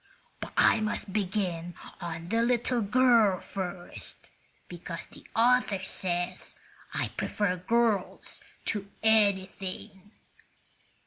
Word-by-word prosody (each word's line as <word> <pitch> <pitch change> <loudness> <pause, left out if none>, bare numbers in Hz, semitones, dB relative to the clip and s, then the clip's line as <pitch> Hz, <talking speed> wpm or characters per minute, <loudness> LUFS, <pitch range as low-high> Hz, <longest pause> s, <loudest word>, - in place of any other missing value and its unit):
But - - -6
I - - +6
must 215 -2 -2
begin 180 -4 -1 0.3
on 170 0 -5
the 230 +2 +2
little 240 0 +2
girl 225 -3 +4
first, 180 -2 -7 0.4
because 170 -1 -7
the - - -15
author 240 -3 +4
says 180 -1 -2 0.4
I - - -1
prefer 200 -3 -1
girls 220 +1 0 0.2
to 200 -2 -2
anything." 200 -2 +1
200 Hz, 100 wpm, -29 LUFS, 180-220 Hz, 0.4 s, I